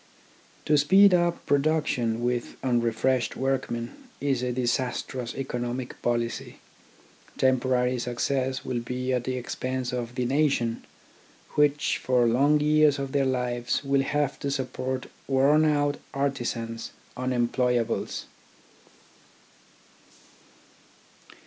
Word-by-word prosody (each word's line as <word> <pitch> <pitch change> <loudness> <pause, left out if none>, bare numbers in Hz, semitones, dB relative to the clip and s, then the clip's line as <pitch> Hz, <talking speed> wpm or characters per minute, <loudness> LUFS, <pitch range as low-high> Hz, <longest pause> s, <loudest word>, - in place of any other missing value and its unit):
To 150 -1 +4
speed 190 +6 +6
up 175 -1 +1
production 140 -6 +1
with 120 0 -1
unrefreshed 120 0 +1
workmen 130 -3 -2 0.3
is 135 -3 0
a 125 0 -1
disastrous 125 0 -2
economic 125 -1 -4
policy. 120 -1 -2 0.8
Tem 130 -1 +3
porary 125 -1 +1
success 130 +2 -1
will 120 - -1
be 125 +2 -3
at 125 -1 -1
the 130 0 -2
expense 130 0 -3
of 120 -1 -4
the 125 - -1
nation, 135 -4 +1 0.7
which, 150 0 +2
for 125 -2 +2
long 140 +6 +4
years 150 -1 +4
of 135 -1 -4
their 140 -1 +2
lives, 125 -1 -1
will 140 0 +2
have 145 0 -1
to 140 - -2
support 130 -1 -3 0.2
worn 140 +3 +4
out 145 -1 +1 0.2
artisans— 120 -4 -2 0.2
unemployables. 125 -1 0
130 Hz, 105 wpm, -26 LUFS, 120-140 Hz, 0.8 s, speed